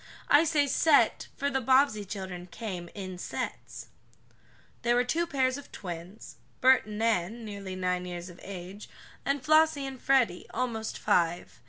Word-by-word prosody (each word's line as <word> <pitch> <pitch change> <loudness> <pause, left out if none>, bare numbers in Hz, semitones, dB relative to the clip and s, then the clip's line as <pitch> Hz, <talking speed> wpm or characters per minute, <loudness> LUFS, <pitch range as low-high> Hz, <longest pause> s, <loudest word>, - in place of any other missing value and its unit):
I 295 +3 +6
say 300 -2 +3
"set" 285 +2 +3
for 280 0 -1
the 265 -1 0
Bobbsey 260 -4 +3
children 190 -2 -6
came 180 -4 -6
"in 185 -3 -6
sets." - - -6 0.9
There 240 0 +2
were 245 - +4
two 330 +7 0
pairs 260 -2 +1
of 285 - -14
twins, 175 +1 -8 0.2
Bert 260 -3 +5
and 210 -1 -6
Nan, 225 0 0
nearly 200 -3 -6
nine 180 -1 -1
years 175 0 -6
of 180 -1 -12
age, 190 +1 -8 0.4
and 275 -1 0
Flossie 310 -2 +4
and 265 -2 -7
Freddie, 250 -10 +2
almost 225 -3 -2
five. 170 -7 0
220 Hz, 155 wpm, -29 LUFS, 185-270 Hz, 0.9 s, I